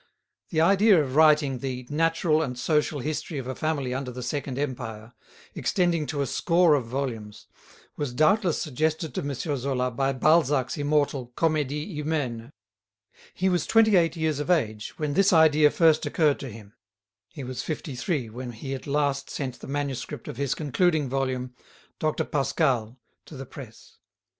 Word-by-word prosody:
The 160 Hz, -2 st, +1 dB
idea 195 Hz, +2 st, +5 dB
of 135 Hz, -3 st, -2 dB
writing 150 Hz, -4 st, +4 dB
the 125 Hz, -1 st, -4 dB
"natural 160 Hz, 0 st, +2 dB
and 125 Hz, -5 st, -3 dB
social 150 Hz, +1 st, 0 dB
history 155 Hz, +2 st, -4 dB
of 135 Hz, -, -4 dB
a 130 Hz, -, -3 dB
family 140 Hz, -4 st, -2 dB
under 130 Hz, 0 st, -3 dB
the 125 Hz, 0 st, -7 dB
Second 135 Hz, 0 st, -3 dB
Empire," 120 Hz, -5 st, -5 dB, 0.4 s
extending 170 Hz, -5 st, 0 dB
to 145 Hz, -2 st, -2 dB
a -, -, +1 dB
score 170 Hz, +3 st, +3 dB
of 135 Hz, -5 st, 0 dB
volumes, 115 Hz, -5 st, -5 dB, 0.5 s
was 145 Hz, -4 st, -2 dB
doubtless 160 Hz, -, +2 dB
suggested 155 Hz, +3 st, -1 dB
to -, -, -2 dB
M. 140 Hz, -1 st, -3 dB
Zola 130 Hz, -3 st, -2 dB
by 135 Hz, +3 st, 0 dB
Balzac's 140 Hz, -1 st, +2 dB
immortal 145 Hz, -3 st, 0 dB
"Comedie 150 Hz, -2 st, 0 dB
Humaine." 145 Hz, -6 st, -3 dB, 0.8 s
He 190 Hz, -, 0 dB
was 180 Hz, -2 st, +1 dB
twenty 220 Hz, -2 st, +5 dB
eight 170 Hz, -1 st, +3 dB
years 160 Hz, -3 st, 0 dB
of 150 Hz, -, -4 dB
age 110 Hz, -11 st, 0 dB
when 150 Hz, -2 st, -2 dB
this 195 Hz, +5 st, +4 dB
idea 155 Hz, -3 st, +6 dB
first 160 Hz, 0 st, +3 dB
occurred 150 Hz, -4 st, +2 dB
to 135 Hz, -, -6 dB
him; 105 Hz, -2 st, -12 dB, 0.6 s
he 145 Hz, -, -8 dB
was 130 Hz, 0 st, -4 dB
fifty 155 Hz, -2 st, -5 dB
three 135 Hz, -, -2 dB
when 120 Hz, +2 st, -7 dB
he 135 Hz, +4 st, -6 dB
at 135 Hz, -, -7 dB
last 140 Hz, -1 st, 0 dB
sent 130 Hz, -3 st, -5 dB
the -, -, -10 dB
manuscript 140 Hz, -2 st, -4 dB
of -, -, -7 dB
his 140 Hz, -1 st, -1 dB
concluding 155 Hz, 0 st, +1 dB
volume, 130 Hz, -1 st, -2 dB, 0.5 s
"Dr. 155 Hz, -1 st, 0 dB
Pascal," 135 Hz, -4 st, 0 dB, 0.3 s
to 150 Hz, -, -10 dB
the 135 Hz, -, -7 dB
press. 120 Hz, -3 st, -12 dB
145 Hz, 165 wpm, -26 LUFS, 130-155 Hz, 0.8 s, idea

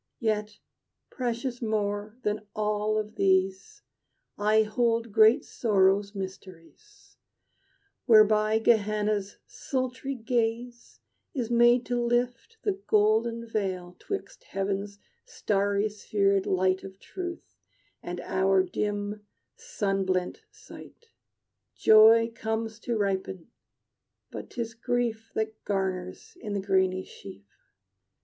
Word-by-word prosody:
"Yet 210 Hz, -2 st, -1 dB, 0.5 s
precious 245 Hz, 0 st, -3 dB
more 210 Hz, -1 st, -2 dB
than 210 Hz, 0 st, -2 dB
all 210 Hz, 0 st, 0 dB
of 215 Hz, 0 st, -4 dB
these 190 Hz, 0 st, 0 dB, 0.5 s
I 215 Hz, +1 st, +3 dB
hold 230 Hz, +1 st, 0 dB
great 220 Hz, +6 st, +5 dB
Sorrow's 200 Hz, -2 st, +2 dB
mysteries, 190 Hz, -, -10 dB, 0.9 s
Whereby 215 Hz, -1 st, +5 dB
Gehenna's 210 Hz, -2 st, +1 dB
sultry 260 Hz, 0 st, -4 dB
gale 235 Hz, 0 st, -1 dB, 0.6 s
Is 240 Hz, -4 st, -2 dB
made 240 Hz, +1 st, +5 dB
to 245 Hz, -1 st, -1 dB
lift 240 Hz, -, -1 dB
the 395 Hz, -2 st, -1 dB
golden 225 Hz, +2 st, +2 dB
veil 185 Hz, -5 st, -3 dB
'Twixt 405 Hz, +4 st, -6 dB
heaven's 200 Hz, -, -3 dB, 0.3 s
starry 200 Hz, 0 st, 0 dB
spherèd 200 Hz, -2 st, 0 dB
light 185 Hz, 0 st, +1 dB
Of 190 Hz, 0 st, -10 dB
truth 355 Hz, -2 st, -7 dB, 0.5 s
and 175 Hz, 0 st, -6 dB
our 190 Hz, +1 st, +2 dB
dim, 205 Hz, +2 st, -3 dB, 0.3 s
sun 205 Hz, -, -2 dB
blent 185 Hz, -1 st, -1 dB
sight. 465 Hz, -, -15 dB, 0.7 s
Joy 225 Hz, +1 st, +6 dB
comes 225 Hz, 0 st, -3 dB
to 235 Hz, 0 st, -2 dB
ripen; 190 Hz, -1 st, -2 dB, 0.8 s
but -, -, -8 dB
'tis 230 Hz, -2 st, -5 dB
Grief 230 Hz, -1 st, -2 dB
That 220 Hz, 0 st, -3 dB
garners 190 Hz, -2 st, -3 dB
in 210 Hz, -3 st, -5 dB
the -, -, 0 dB
grainy 190 Hz, -1 st, +1 dB
sheaf. 95 Hz, +1 st, -12 dB
215 Hz, 105 wpm, -27 LUFS, 195-235 Hz, 0.9 s, Joy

